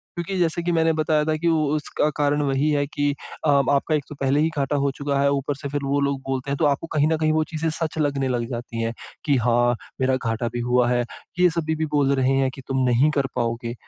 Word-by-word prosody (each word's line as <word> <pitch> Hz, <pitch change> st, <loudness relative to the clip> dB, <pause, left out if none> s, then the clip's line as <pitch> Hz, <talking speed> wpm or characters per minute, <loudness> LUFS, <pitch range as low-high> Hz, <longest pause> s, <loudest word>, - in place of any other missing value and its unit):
क्योंकि 175 Hz, +2 st, -3 dB
जैसे 170 Hz, -1 st, +1 dB
कि 175 Hz, -, 0 dB
मैंने 165 Hz, -1 st, +3 dB
बताया 155 Hz, -1 st, +1 dB
था 155 Hz, 0 st, +1 dB
कि 170 Hz, -, +1 dB
उसका 155 Hz, -1 st, +1 dB
कारण 145 Hz, 0 st, +1 dB
वही 140 Hz, +2 st, +1 dB
है 145 Hz, -1 st, +1 dB
कि 145 Hz, 0 st, 0 dB, 0.3 s
अ, 150 Hz, -, +3 dB
आपका 140 Hz, +2 st, +3 dB
एक 150 Hz, -, -1 dB
तो 150 Hz, -, -8 dB
पहले 135 Hz, +1 st, +2 dB
ही 160 Hz, +2 st, +3 dB
घाटा 140 Hz, +1 st, 0 dB
हो 140 Hz, 0 st, +1 dB
चुका 140 Hz, -1 st, -1 dB
है, 140 Hz, 0 st, +3 dB
ऊपर 140 Hz, 0 st, -1 dB
से 140 Hz, +1 st, -6 dB
फिर 145 Hz, 0 st, -2 dB
वो 140 Hz, +1 st, +1 dB
लोग 140 Hz, -1 st, 0 dB
बोलते 135 Hz, +1 st, -2 dB
हैं, 140 Hz, -, -1 dB
तो 160 Hz, -, +2 dB
आपको 145 Hz, +3 st, +1 dB
कहीं 150 Hz, 0 st, +3 dB
न 160 Hz, 0 st, +1 dB
कहीं 155 Hz, 0 st, +1 dB
वो 155 Hz, 0 st, +2 dB
चीज़ें 160 Hz, 0 st, -1 dB
सच 160 Hz, 0 st, -3 dB
लगने 140 Hz, -3 st, 0 dB
लग 120 Hz, -2 st, -1 dB
जाती 120 Hz, -1 st, -5 dB
हैं, 115 Hz, -, -1 dB, 0.3 s
कि 145 Hz, -3 st, +3 dB
"हाँ, 120 Hz, +1 st, +2 dB, 0.3 s
मेरा 130 Hz, 0 st, +3 dB
घाटा 115 Hz, -2 st, -2 dB
भी 120 Hz, -, -2 dB
हुआ 125 Hz, 0 st, +2 dB
है। 120 Hz, 0 st, +2 dB, 0.4 s
ये 180 Hz, 0 st, +6 dB
सभी 160 Hz, -1 st, -1 dB
भी 160 Hz, 0 st, -1 dB
बोल 140 Hz, -1 st, +3 dB
रहे 135 Hz, 0 st, +2 dB
हैं 135 Hz, -1 st, +2 dB
कि 135 Hz, -, -9 dB
तुम 130 Hz, -1 st, 0 dB
नहीं 125 Hz, +5 st, +4 dB
कर 135 Hz, -, +1 dB
पाओगे।" 115 Hz, -1 st, -2 dB
140 Hz, 255 wpm, -23 LUFS, 130-155 Hz, 0.4 s, ये